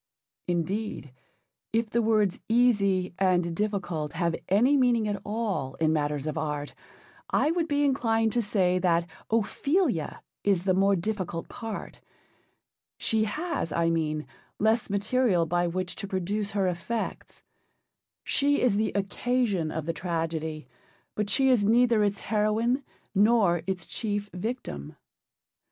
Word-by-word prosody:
Indeed, 180 - -2 0.6
if 225 -1 0
the 235 - +2
words 215 -4 +2
easy 200 -7 +3
and 175 -3 +2
difficult 185 -7 -2
have 170 -1 0
any 235 +9 +4
meaning 245 -5 +3
at 205 -1 -2
all 205 - -2
in 160 -1 +2
matters 150 -2 -1
of 155 +1 -2
art, 150 -2 -3 0.6
I 305 - +2
would 335 -1 0
be 290 -1 +1
inclined 225 -5 +2
to 240 - +2
say 185 -4 +2
that 170 -2 +2 0.2
Ophelia 230 - 0 0.2
is 195 -4 +2
the 190 -1 +2
more 195 +1 +3
difficult 180 -3 -3
part. 225 -3 -7 1.0
She 220 -1 +1
has, 305 - -3
I 165 +1 +1
mean, 155 -2 -1 0.3
less 220 +2 +2
material 200 -2 +2
by 175 +2 +1
which 180 +1 -3
to 200 - -5
produce 195 +2 -2
her 195 - +2
effects. 185 +6 -4 0.8
She 285 +1 +2
is 230 -5 +2
the 215 +1 +1
occasion 200 -3 0
of 155 -1 -4
the 165 - -1
tragedy, 160 -4 -3 0.5
but 210 -1 -2
she 265 +6 +3
is 235 -5 +4
neither 230 0 +4
its 200 -1 0
heroine 220 +5 +1 0.3
nor 205 -4 +4
its 185 -3 -2
chief 205 -2 -3
victim. 180 - -5
200 Hz, 135 wpm, -27 LUFS, 170-225 Hz, 1.0 s, any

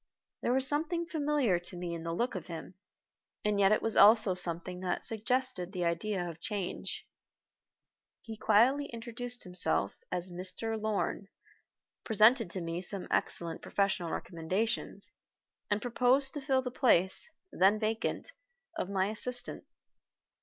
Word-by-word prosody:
There - - 0
was 265 +1 +3
something 320 +4 +1
familiar 290 - +1
to 175 +1 -5
me 175 -1 -4
in 165 - -5
the 165 0 -4
look 235 +9 -1
of 180 -4 -6
him, 170 +1 -7 0.7
and 210 -1 +1
yet 195 0 +5
it 215 - +2
was 225 - -1
also 215 -1 +7
something 180 0 +2
that 180 -1 -3
suggested 230 -4 -2
the 180 -2 -1
idea 175 +2 -1
of 165 -1 -8
change. 195 0 -4 1.2
He 225 -1 -7
quietly 235 +7 +3
introduced 240 +1 -5
himself 180 - 0 0.2
as 180 0 -2
"Mr. 185 +5 -3
Lorn," 215 -2 -2 0.8
presented 220 0 +5
to 185 - -5
me 165 +1 -3
some 190 +1 -4
excellent 165 -1 -1
professional 195 -4 0
recommendations, 185 +8 -3 0.6
and 205 0 +1
proposed 255 +3 +3
to 295 - -5
fill 265 -1 +1
the 250 - -4
place, 190 - +2 0.2
then 195 +3 +4
vacant, 220 - -2 0.4
of 195 - -3
my 190 -1 +1
assistant. 245 +3 -4
210 Hz, 140 wpm, -31 LUFS, 180-245 Hz, 1.2 s, also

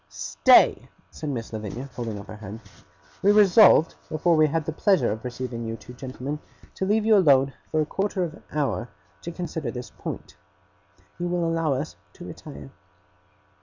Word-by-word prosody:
'Stay!' 75 0 +4 0.2
said 155 - -6
Miss 115 -5 -5
Lavinia, 110 +5 -5
holding 115 -4 -4
up 100 - -9
her 105 - -10
hand; 105 +1 -8 0.6
'we 200 - +5
resolved, 205 -4 +6 0.2
before 165 +2 +2
we 155 0 +5
had 155 +1 -1
the 160 - -2
pleasure 160 - +2
of 110 +1 -5
receiving 125 -1 -5
you 115 - -3
two 115 +2 -12
gentlemen, 130 +3 -6 0.3
to 190 - -3
leave 215 +1 +2
you 220 -1 +6
alone 140 -8 +4 0.2
for 155 - +1
a - - 0
quarter 195 +3 -1
of 165 -3 -4
an - - -15
hour, 145 -4 -1 0.3
to 170 - -6
consider 165 -3 -4
this 125 -1 -7
point. 75 - -8 0.8
You 175 - -1
will 175 -1 0
allow 165 -3 +1
us 145 +4 -5 0.2
to - - -11
retire. 70 -1 -10
145 Hz, 175 wpm, -25 LUFS, 115-170 Hz, 0.8 s, resolved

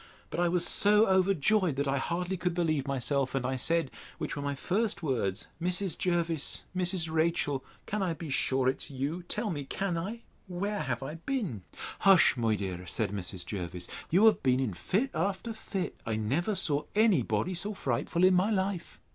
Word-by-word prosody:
But - - -3
I 175 0 +3
was 175 0 +1
so 210 +2 +5
overjoyed, 190 -2 +3
that 140 +1 -1
I 135 0 +1
hardly 180 +5 -2
could 180 -1 -1
believe 155 -5 0
myself; 135 0 0
and 130 -2 0
I 130 +1 0
said, 160 +1 0 0.3
which - - -3
were 145 - -4
my 140 0 -2
first 195 - -1
words, 110 -9 0 0.2
Mrs. 180 +1 +2
Jervis, 170 -4 -1
Mrs. 180 -2 +1
Rachel, 160 -4 +1 0.2
can 210 0 -2
I 175 -4 0
be 160 -3 -6
sure 130 0 +2
it 130 - 0
is - - -11
you? 140 +6 -3
Tell 215 -1 -1
me! 145 -4 -3
can 175 +4 -2
I?—Where 200 0 -5
have 130 0 -2
I 135 - -5
been? 205 - -1 0.4
Hush, 195 -7 +6
my 115 -3 +1
dear, 90 -3 -5
said - - -1
Mrs. 95 -2 -4
Jervis; 90 -3 -5 0.2
you 190 +7 +5
have 220 - +5
been 130 -1 +3
in 125 -7 -1
fit 195 - -1
after 200 +4 -1
fit. 195 -4 -4
I 110 - -2
never 140 - 0
saw 150 -5 +1
any 210 - +5
body 110 - -1
so 200 +4 -2
frightful 140 +5 -1
in 185 0 +7
my 185 +3 +3
life! 190 -4 -2
165 Hz, 190 wpm, -30 LUFS, 130-190 Hz, 0.4 s, in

